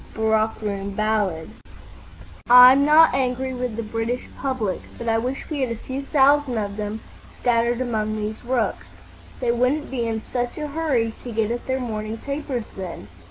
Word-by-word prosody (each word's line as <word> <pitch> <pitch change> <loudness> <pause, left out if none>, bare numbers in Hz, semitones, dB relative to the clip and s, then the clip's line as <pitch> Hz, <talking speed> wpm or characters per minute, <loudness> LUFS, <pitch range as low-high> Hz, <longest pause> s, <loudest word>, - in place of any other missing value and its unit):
—Barrack 220 0 +1
Room 200 -1 -3
Ballad. 210 -6 -1 1.0
"I'm 250 +3 +9
not 310 +2 +6
angry 260 0 -1
with 250 -3 -3
the 230 - -3
British 225 +3 -3
public, 255 -8 -2 0.2
but 235 - -6
I 225 0 +2
wish 255 +4 -4
we 300 -3 -3
had 260 - 0
a 230 - -2
few 260 +4 -6
thousand 280 -2 +3
of 200 -2 -3
them 210 +1 -4 0.4
scattered 240 0 +1
among 215 -3 -1
these 215 +1 -4
rooks. 245 -2 -1 0.5
They 245 -2 +1
wouldn't 255 +6 0
be 240 -3 -1
in 225 -1 -2
such 245 +2 -4
a 300 -1 -4
hurry 280 -8 0
to 245 - -6
get 220 0 0
at 240 - -4
their 260 0 0
morning 220 -2 -4
papers 275 -3 -4
then. 180 - -7
235 Hz, 170 wpm, -23 LUFS, 220-260 Hz, 1.0 s, I'm